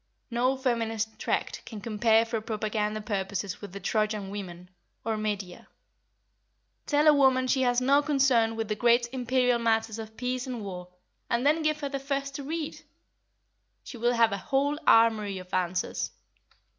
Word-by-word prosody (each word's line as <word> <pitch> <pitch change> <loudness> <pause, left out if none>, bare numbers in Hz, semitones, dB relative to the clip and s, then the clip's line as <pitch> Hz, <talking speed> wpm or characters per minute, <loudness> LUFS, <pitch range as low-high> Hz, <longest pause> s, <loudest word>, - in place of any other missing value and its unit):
No 250 +3 +1
feminist 225 -4 -1
tract - - -2
can 220 - -8
compare 225 +1 +2
for 225 -1 -3
propaganda 215 -1 -2
purposes 200 -2 -3
with 205 -3 -8
The 200 - -7
Trojan 210 0 -1
Women, 180 -3 -8 0.3
or 225 -1 0
Medea. 205 -4 -4 1.2
Tell 295 +1 +3
a 305 - +8
woman 265 -2 +4
she 260 +1 +1
has 245 -1 +3
no 275 +3 +4
concern 265 -6 +2
with 225 -1 -3
the 215 - 0
great 235 +2 +3
imperial 250 -1 +1
matters 225 -1 0
of 220 0 -9
peace 250 0 -2
and 245 -4 -5
war, 180 -2 -7 0.4
and 235 +3 0
then 310 +3 +3
give 305 0 0
her 285 - -2
the 275 0 -3
first 275 0 -3
to 285 - -6
read! 310 +1 -4 1.0
She 245 - -9
will 240 +1 +2
have 230 -2 +4
a 200 - -1
whole 285 +6 0
armoury 220 -3 +4
of 185 0 -11
answers. 180 0 -1
230 Hz, 165 wpm, -28 LUFS, 210-260 Hz, 1.2 s, a